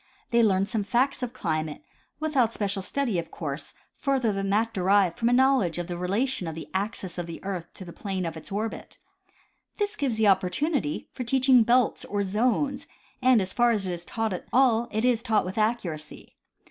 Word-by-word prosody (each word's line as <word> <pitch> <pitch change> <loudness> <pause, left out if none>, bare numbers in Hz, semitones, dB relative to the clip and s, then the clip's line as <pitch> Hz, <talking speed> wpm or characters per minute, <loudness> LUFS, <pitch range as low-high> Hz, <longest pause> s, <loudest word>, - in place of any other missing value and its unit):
They 235 0 +4
learn 195 -3 +3
some 215 -1 -1
facts 250 +7 +1
of 250 -2 -3
climate 155 -10 -3 0.4
without 275 -7 +1
special 200 -2 -1
stud}^, 230 -1 -1
of 165 -1 -6
course, 145 -3 -6 0.2
further 265 -6 0
than 195 0 -2
that 225 +3 +1
derived 190 -1 +2
from 235 0 +2
a - - +3
knowledge 255 - +3
of 175 - -2
the 175 0 -5
relation 200 +4 -1
of 160 - -5
the 160 - -7
axis 190 -2 -3
of 175 - -4
the 165 - -7
earth 185 -4 -5
to 190 - -9
the 170 - -10
plane 190 -3 -3
of 165 - -4
its 160 - -10
orbit. 215 +3 -4 0.8
This 415 0 -1
gives 260 - -1
opportunity 195 - +1
for 255 - -4
teaching 260 0 +4
belts 240 +1 +3
or 205 0 -1
zones, 250 +7 0 0.3
and 255 -3 +5
as 185 - -6
far 240 0 +4
as 210 -4 +1
it 180 - -2
is 170 0 -7
taught 225 +2 -2
at 180 - -6
all 240 -3 +4
it 220 +2 -1
is 245 -3 +2
taught 220 -5 +1
with 185 +4 -4
accuracy. 185 -9 -3
215 Hz, 200 wpm, -26 LUFS, 185-245 Hz, 0.8 s, and